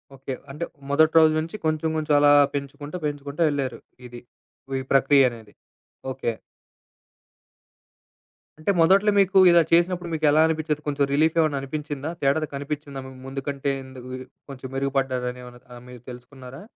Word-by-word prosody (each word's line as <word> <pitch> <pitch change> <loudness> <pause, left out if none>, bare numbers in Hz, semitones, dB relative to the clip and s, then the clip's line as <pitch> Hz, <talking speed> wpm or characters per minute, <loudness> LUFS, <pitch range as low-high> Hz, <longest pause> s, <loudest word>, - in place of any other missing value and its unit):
Okay. 135 0 -6 0.2
అంటే 150 +5 -6 0.3
మొదటి 155 +3 +3
రోజు 160 -1 +5
నుంచి 165 +5 -5
కొంచేం 155 0 0
కొంచేం 155 -1 +1
అలా 145 0 +5 0.2
పెంచుకుంటా 145 +3 -6
పెంచుకుంటా 145 +2 -3
ఎళ్లారు. 135 -4 -3 0.3
ఇది. 120 0 -11 0.6
ఈ - - -4
ప్రక్రియనేది. 125 -6 +3 0.6
ఓకే. 130 -2 -2 2.3
అంటే 155 +6 0
మొదట్లో 195 +5 +5
మీకు 195 0 +4
ఇలా 170 -1 +6
చేసినప్పుడు 175 +1 +2
మీకెలా 155 -1 +3
అనిపిచ్చేది? 155 -2 -2
కొంచేం 140 -1 0
రిలీఫేమన్నా 155 0 +2
అనిపించిందా, 145 +1 -5
తేడాది 145 +3 +1
కనిపించిందా? 140 -1 -5
ము 130 - -10 0.2
ముందు 135 +1 -5
కంటే, 140 0 -2
ఎందుకు 130 -1 -11 0.4
కొంచేం 130 -1 -9
మెరుగుపడ్డారని 130 -2 -2
ఏమైనా 125 0 -13
మీరు 125 -1 -12
తెలుసుకున్నారా? 125 +1 -12
145 Hz, 130 wpm, -24 LUFS, 130-155 Hz, 2.3 s, ఇలా